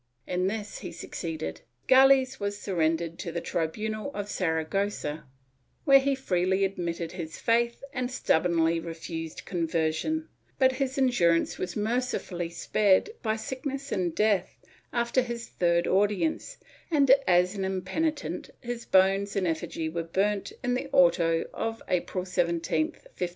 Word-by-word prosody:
In 180 +1 0
this 210 0 -4
he - - -7
succeeded; 160 - -5 0.2
Gales 265 0 +5
was 205 0 -2
surrendered 165 -3 -1
to 170 - -4
the 170 - -2
tribunal 215 - -2
of 205 0 -4
Saragossa, 160 -2 -1 0.6
where 275 -2 +8
he 275 0 +1
freely 190 -5 +1
admitted 170 -3 -3
his 170 -3 -6
faith 235 +1 +1
and 255 -2 -2
stubbornly 170 -8 +2
refused 165 -1 -6
conver 165 -3 0
sion, 315 - -2 0.3
but 260 -1 +5
his 260 0 -2
endurance 185 -11 +2
was 180 -1 -3
mercifully 210 -6 -1
spared 200 - +2
by 220 -1 0
sickness 270 +5 -5
and 175 -3 -1
death 210 -4 +1 0.3
after 235 +2 +1
his 235 -1 -5
third 170 -1 +1
audience 210 - +1 0.3
and, 285 -5 +4 0.2
as 180 +1 +4
an 195 -2 -3
impenitent, 190 - -2
his 240 -1 -5
bones 195 +1 +3
and 195 -2 +1
effigy 165 -1 -2
were 165 +1 -2
burnt 195 +5 -1
in 245 -1 +1
the 250 - -2
auto 170 -2 +4
of 225 0 -3
April 180 +1 -1
17, 170 -3 +1
1597. 180 - -6
190 Hz, 140 wpm, -28 LUFS, 170-235 Hz, 0.6 s, where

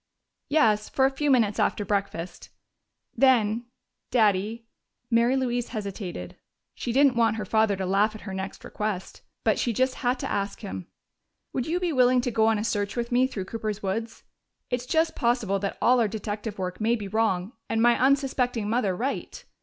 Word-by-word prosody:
"Yes, 220 -8 +3
for 265 - +2
a 270 - +3
few 290 +2 -1
minutes 225 -6 +3
after 205 - +1
breakfast. 195 -3 -3 0.7
Then 240 -3 +3 0.4
Daddy 215 0 +1 0.2
" 240 - -53
Mary 235 +3 +4
Louise 245 -2 -1
hesitated: 195 - -6 0.4
she 240 - -4
didn't 270 +1 +4
want 225 -2 +3
her 215 -2 -4
father 220 0 +2
to 190 0 -3
laugh 205 +4 +2
at 215 - -9
her 195 - -7
next 190 0 -5
request, 210 -3 -4 0.2
but - - +2
she 240 - 0
just 260 +3 +1
had 250 +1 +1
to - - -4
ask 200 +2 -2
him 190 -4 -6 0.7
"would 255 - -2
you 345 +3 0
be 355 -3 -1
willing 250 -1 +4
to 245 - -2
go 220 0 +3
on 225 -1 +3
a 210 - -2
search 205 -2 -1
with 235 0 -3
me 250 +2 +4
through 200 -8 -5
Cooper's 215 -1 -4
woods? 225 +4 -3 0.5
It's 245 0 -2
just 320 +2 +1
possible 235 -6 +1
that 200 0 -3
all 250 +1 +4
our 230 - +3
detective 210 0 -5
work 185 +1 -4
may 230 +2 +3
be 210 -4 -5
wrong 205 -1 0 0.2
and 225 - 0
my 240 +1 +5
unsuspecting 260 -4 +1
mother 215 -4 +1
right. 260 +8 -4
225 Hz, 185 wpm, -26 LUFS, 205-250 Hz, 0.7 s, my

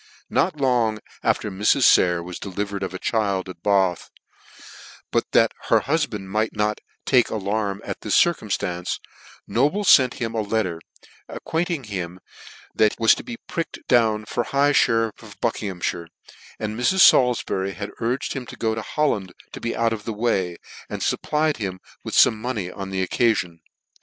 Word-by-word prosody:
Not - - +2
long 120 -5 +2 0.2
after - - +1
this 100 +3 +3
Mrs. 135 - +1
Sayer 90 -5 +5
was 90 0 -7
delivered 100 +1 -4
of 95 - -3
a 95 - -5
child 100 -3 -1
at 90 -2 -10
Bath: 95 -4 +1 1.0
but - - 0
that - - +5 0.2
the - - +5
hufband 140 -9 -1
might 110 +4 -1
not 105 0 0 0.3
take 125 -3 +4
alarm 100 -1 -2
at - - -5
this 105 - +1
circumftance, 95 - 0 0.5
Noble 150 - +1
fent 130 -9 +6
him 115 -1 -3
a 110 - 0
letter, 100 -6 -1 0.5
acquainting 165 -3 -2
him 95 -4 -5 0.5
that 110 -1 +3
he - - -12
\vas 115 -1 +6
to - - -5
be 240 -2 -7
pricked 165 -2 -4
down 110 -3 +3
for 120 - -2
high 140 +1 +2
{her 115 -4 +3
iff - - -20
of 110 -3 -14
Buckinghammire; 95 -7 -2 0.5
and 110 0 -4
Mrs. 185 +11 +3
Salifbury 100 - +4 0.2
urged 120 +4 -1
him 130 -3 -6
to - - -9
go 110 -1 -1
to 110 - -3
Holland 105 -10 -1 0.2
to - - -9
be 115 - -2
out 115 0 +1
of 105 -2 -7
the 115 - -3
way, 95 -6 0 0.3
and - - -4
fupplied 155 0 0
him 95 -4 -4 0.2
w'th - - -4
fome 110 - +6
money 110 -5 -3
on 95 0 -7
the 95 -1 -1
occafion. 90 -9 +1
110 Hz, 170 wpm, -23 LUFS, 95-125 Hz, 1.0 s, fent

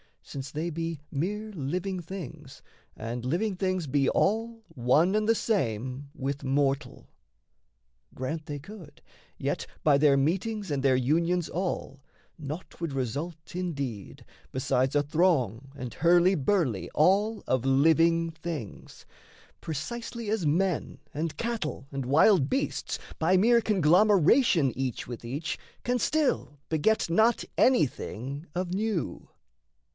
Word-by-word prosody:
since 135 -1 -7
they 155 +5 -3
be 165 -1 -3
Mere 210 +9 -2
living 180 +3 -3
things 160 -5 -9 0.3
and 115 +2 -5
living 185 +9 0
things 185 -2 -1
be 140 -1 +2
all 225 +2 0
One 140 +10 +2
and 215 0 +1
the 225 - +5
same 130 - -1
with 140 -1 -3
mortal. 135 0 -1 1.1
Grant 150 +5 -4
they 145 - -5
could, 185 +3 -12 0.4
Yet - - -2 0.2
by 145 -3 +5
their 145 -2 +5
meetings 195 +7 -1
and 140 -2 0
their 130 -1 +4
unions 165 +7 +1
all, 175 -6 -3 0.4
Naught 155 +4 -7
would 165 -4 -3
result, 150 +6 -4
indeed, 140 - -4 0.3
besides 130 +1 0
a 145 - +4
throng 140 - +1
And 125 -4 -6
hurly 175 +3 +4
burly 135 - 0
all 205 +7 +3
of 130 -1 0
living 165 +4 +4
things 160 - -7 0.5
Precisely 230 - -5
as 210 -7 0
men, 175 +2 0
and 155 +1 -3
cattle, 225 - -3
and 135 -2 -3
wild 150 - +4
beasts, 270 - -1 0.2
By 180 +4 +4
mere 235 +4 +5
conglomeration 185 - +4
each 130 -2 -3
with 120 -1 -7
each 145 +7 -4 0.2
Can 245 0 0
still 285 - 0
beget 165 +6 +2
not 220 +8 +3
anything 140 - +1
of 180 0 -2
new. 205 - -2
160 Hz, 125 wpm, -28 LUFS, 135-190 Hz, 1.1 s, the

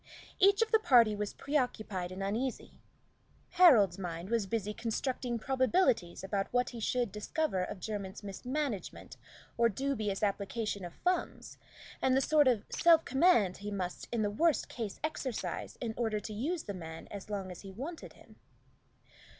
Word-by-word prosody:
Each 400 +3 +6
of 450 - -6
the 445 - +5
party 235 - +5
was 205 0 -4
preoccupied 215 -10 -2
and 190 +1 -5
uneasy. 225 +6 -3 0.8
Harold's 235 - +6
mind 175 +1 -5
was 230 -4 +1
busy 210 0 -2
constructing 240 +2 -2
probabilities 260 - +1
about 195 0 -2
what 245 0 +1
he 240 - -7
should 240 0 0
discover 210 0 -1
of 190 +1 -6
Jermyn's 200 -1 -5
mismanagement 245 +3 -4 0.4
or 235 0 +5
dubious 215 -4 -2
application 205 0 -1
of 175 - -9
funds, 360 0 -2 0.4
and 260 0 +3
the - - +5
sort 295 0 +4
of 230 -5 +2
self 330 -2 +5
command 265 - +3
he 205 +1 -6
must 185 -3 -4
in 230 -2 0
the 205 - 0
worst 320 +9 +2
case 220 -5 -5
exercise 280 -6 -3
in 230 -3 -3
order 220 -3 0
to 210 +1 -7
use 305 +11 -2
the 200 - -5
man 160 -3 -8
as 200 0 -8
long 195 -3 -4
as 180 - -9
he 195 - -9
wanted 285 - -7
him. - - -19
225 Hz, 160 wpm, -32 LUFS, 195-265 Hz, 0.8 s, Each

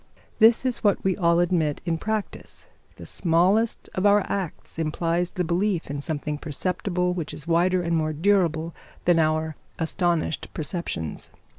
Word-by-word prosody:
This 225 +3 +6
is 255 -2 0
what 205 -2 +2
we 190 -1 +2
all 170 -2 +3
admit 165 -4 +1
in 165 -2 -1
practice; 215 +1 -4 0.3
the - - -10
smallest 185 +7 +2
of 185 - -2
our 205 0 +5
acts 185 -4 -4
implies 165 +2 0
the 180 - -2
belief 175 -1 0
in 145 0 -3
something 150 -1 -3
perceptible 180 +3 -1
which 170 -4 -4
is 150 - -8
wider 175 +2 +2
and 170 0 0
more 155 -1 +1
durable 165 -1 +1 0.3
than 175 -1 +4
our 155 0 +1 0.2
astonished 165 -1 -1
perceptions. 150 - -4
170 Hz, 150 wpm, -25 LUFS, 160-185 Hz, 0.3 s, This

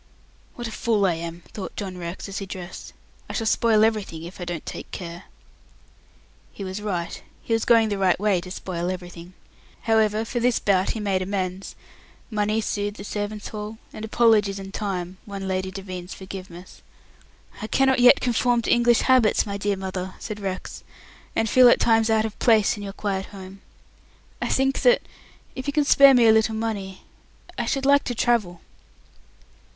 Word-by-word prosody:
"What 240 -1 -5
a - - -7
fool 215 -3 +1
I 180 - +3
am," 165 +1 -6
thought 195 -3 -7
John 190 -3 -5
Rex, 175 +2 -6
as 195 0 -5
he 195 - -6
dressed. 180 -1 -8 0.4
"I - - -5
shall 225 - -2
spoil 220 -1 +4
everything 205 -7 -2
if 175 +2 -10
I - - -3
don't 175 -2 -5
take - - -7
care." 170 0 -8 1.3
He 200 - -8
was 190 +2 -5
right. 180 -5 -3 0.2
He 230 - -2
was 225 0 +1
going 230 -2 +5
the 200 -1 -2
right 185 -2 +2
way 200 -3 +2
to 180 - -10
spoil 180 -1 -4
everything. 180 -1 -7 0.5
However, 220 -1 +2
for 240 +1 -3
this 245 0 +2
bout 190 -2 +1
he - - -4
made 195 -3 0
amends 185 0 -3 0.6
money 215 +1 0
soothed 205 0 -3
the - - -8
servants' 205 0 -4
hall, 215 +1 -6 0.2
and 215 - -8
apologies 220 -3 +3
and 195 0 -8
time 185 -3 -4
won 195 -1 -5
Lady 185 0 -1
Devine's 185 -2 -7
forgiveness. 185 -2 -10 0.8
"I 215 - -4
cannot 265 +2 +2
yet 250 +3 +7
conform 245 -1 +1
to - - 0
English 240 -1 +4
habits, 255 -5 +4
my 200 -1 -4
dear 200 0 -1
mother," 190 -1 -5
said 215 -2 -6
Rex, 190 -2 -5 0.5
"and 225 - +1
feel 250 +2 +7
at - - +4
times 225 -1 +3
out 220 0 +3
of 220 - -6
place 225 -2 +4
in 205 - -9
your 200 -1 -5
quiet 195 -2 -3
home. 195 -1 -11 0.8
I - - -1
think 270 0 +1
that - - +4 0.5
if 260 0 -7
you 285 - -1
can 295 -1 +2
spare 275 -1 +7
me 240 -2 +5
a 220 - +7
little 220 0 +2
money 205 -4 -4 0.5
I - - -3
should 275 -1 -1
like 280 0 +5
to 245 - -3
travel." 215 -8 0
205 Hz, 185 wpm, -24 LUFS, 185-225 Hz, 1.3 s, yet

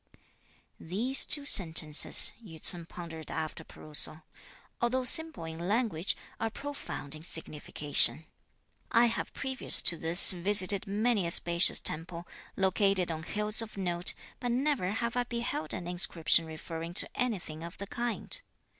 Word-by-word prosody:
"These 230 +11 +2
two 290 -1 +3
sentences," 160 - +4
Yü 165 -7 -13
ts'un 170 0 -10
pondered 165 -3 -10
after 160 -1 -6
perusal, 155 +1 -1 0.6
"although 250 +2 -1
simple 320 - +1
in 165 +2 -8
language, 205 -5 -2 0.2
are 225 - -3
profound 275 - -9
in 155 - -11
signification. 150 -3 0 0.6
I 235 0 +3
have 230 -1 -4
previous 265 -1 +4
to 170 - +4
this 165 +3 +6
visited 195 +2 +3
many 210 -1 -1
a - - -4
spacious 170 +1 +4
temple, 170 +2 -2 0.3
located 190 -2 0
on 160 -1 -6
hills 210 +5 0
of 220 -2 -10
note, 175 -2 0 0.2
but 245 - -5
never 260 -6 -2
have 235 +3 -4
I 245 - -1
beheld 235 -9 -5
an 175 - -6
inscription 170 -2 +2
referring 165 +2 -9
to - - +2
anything 190 -10 -5
of 170 +1 -10
the 200 - -8
kind. 240 - -5
180 Hz, 140 wpm, -28 LUFS, 165-235 Hz, 0.6 s, this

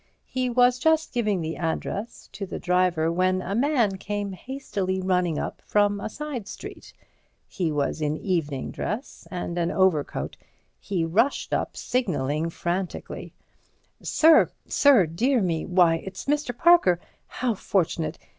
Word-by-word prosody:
He 255 -1 -2
was 245 +1 +4
just 320 +1 +2
giving 210 -7 0
the 160 0 -3
address 185 +6 -4
to 195 - -6
the - - -5
driver, 180 -3 +1
when 185 +1 +1
a 195 - -3
man 235 -5 +2
came 205 +1 -3
hastily 195 -4 -3
running 180 -4 +1
up - - -4
from 205 -1 +2
a 200 - -4
side 270 -5 -6
street. - - -9 0.6
He 175 -5 -2
was 145 +1 -1
in 150 0 0
evening 155 -8 -2
dress 235 +7 -5
and 175 -1 -4
an 170 0 +1
overcoat. 185 -7 0 0.4
He 180 -5 -1
rushed 225 +12 +1
up, - - -1
signalling 160 - -1
frantically. 175 +2 -4 0.7
"Sir—sir!—dear 265 - +4
me! 170 -5 -1
why, 175 -2 +4
it's 190 - -7
Mr. 285 -4 -1
Parker! 335 - +5 0.3
How 250 -2 -1
fortunate! 175 -5 -1
190 Hz, 135 wpm, -25 LUFS, 170-245 Hz, 0.7 s, Parker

